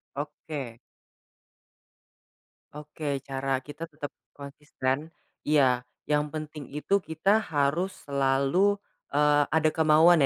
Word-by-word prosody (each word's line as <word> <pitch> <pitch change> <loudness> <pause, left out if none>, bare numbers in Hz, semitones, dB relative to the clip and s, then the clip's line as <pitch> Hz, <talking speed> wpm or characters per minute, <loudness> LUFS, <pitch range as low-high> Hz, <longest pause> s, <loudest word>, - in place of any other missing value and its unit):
Oke. 145 -4 -6 2.0
Oke, 150 -2 -4
cara 135 0 -2
kita 145 +4 -7
tetap 150 -2 -7 0.2
konsisten 145 +1 -4 0.3
iya 130 -5 +3 0.2
yang 150 0 +1
penting 155 -2 -6
itu 175 +7 +1
kita 180 +4 +2
harus 160 0 0 0.2
selalu, 140 +9 +2 0.3
eee, 145 0 +4
ada 160 -1 +2
kemauan 160 0 +5
150 Hz, 95 wpm, -28 LUFS, 140-160 Hz, 2.0 s, kemauan